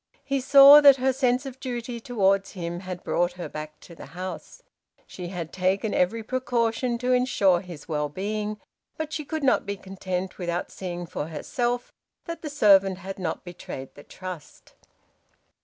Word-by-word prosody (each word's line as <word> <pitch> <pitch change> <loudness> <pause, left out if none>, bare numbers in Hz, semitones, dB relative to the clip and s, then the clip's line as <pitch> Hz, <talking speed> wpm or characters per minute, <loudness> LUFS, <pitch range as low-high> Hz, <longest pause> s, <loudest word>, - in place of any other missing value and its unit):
He 275 -1 -1
saw 275 +2 +9
that 280 -2 +9
her 265 0 +1
sense 255 0 +1
of 265 -1 -8
duty 240 -2 -5
towards 195 -5 +1
him 175 -2 -4
had 185 -1 -7
brought 175 +1 0
her 180 0 -6
back 155 0 -8
to 170 - -13
the - - -11
house. 185 0 -7 0.4
She 180 -2 -8
had 175 -3 -6
taken 190 +3 0
every 220 +5 +1
precaution 240 0 0
to 250 +1 0
ensure 225 -8 +3
his 175 -6 -11
well 150 -2 -1
being, 210 +5 -3 0.4
but 315 -1 -4
she 305 - -3
could 310 +1 -4
not 265 - +3
be 200 0 -4
content 190 -1 -5
without 175 0 -3
seeing 175 -2 -5
for 155 -2 -5
herself 240 +10 -3 0.3
that 335 -1 -6
the 305 - -5
servant 195 -8 +4
had 195 +1 -7
not 165 -4 -3
betrayed 170 -7 -8
the - - -13
trust. 185 -2 -10
195 Hz, 170 wpm, -25 LUFS, 180-250 Hz, 0.4 s, saw